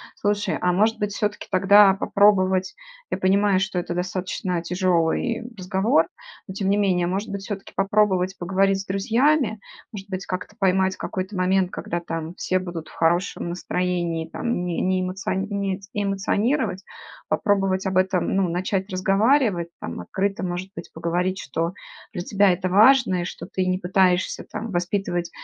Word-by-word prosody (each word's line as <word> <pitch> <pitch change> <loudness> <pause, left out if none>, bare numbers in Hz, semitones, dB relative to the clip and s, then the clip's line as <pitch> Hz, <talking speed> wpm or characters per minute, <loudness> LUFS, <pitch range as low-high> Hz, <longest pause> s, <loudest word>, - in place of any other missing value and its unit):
Слушай, 205 -1 0
а 180 - +2
может 215 +4 +2
быть, 205 0 -2
всё-таки 210 0 -2
тогда 195 +1 +6
попробовать 190 -2 +2 0.4
я - - 0
понимаю, 195 0 +3
что 195 -1 -2
это 175 -1 -2
достаточно 180 0 -2
тяжелый 180 +6 0
разговор, 190 +7 +2 0.4
но 190 - -6
тем 195 -1 -1
не 200 - +3
менее, 185 -4 +2
может 195 +5 -2
быть, 200 -1 -4
всё-таки 200 -2 -7
попробовать 195 -2 +2
поговорить 195 +2 +1
с - - -10
друзьями? 225 +5 +1 0.3
Может 200 -2 -9
быть, 190 0 -4
как-то 185 -1 -5
поймать 190 0 +2
какой-то 190 +2 -5
момент, 185 0 +2
когда 175 -1 -4
там 165 -1 -5
все 185 - 0
будут 175 -3 -6
в - - -15
хорошем 170 +1 0
настроении 175 -2 -2
там, 180 -4 -2
не 175 -2 -2
не 185 0 +1
эмоциони 195 +1 -2
эмоционировать, 200 +2 0 0.5
попробовать 195 -2 +1
об 190 -1 0
этом, 185 -1 +1
ну, 190 -3 +2
начать 190 +3 -2
разговаривать? 195 - +2
Там, 85 - -6
открыто, 195 - -2
может 180 +1 -3
быть, - - -8
поговорить, 175 +3 -1
что 165 +4 -3 0.4
для 175 -4 -4
тебя 200 -1 +3
это 185 +1 -1
важно 215 -1 +5
и - - -3
что - - -7
ты 185 - -2
не 185 - +1
пытаешься 185 0 +1
там 225 0 -5
воспитывать 175 -1 -1
190 Hz, 155 wpm, -23 LUFS, 180-200 Hz, 0.5 s, тогда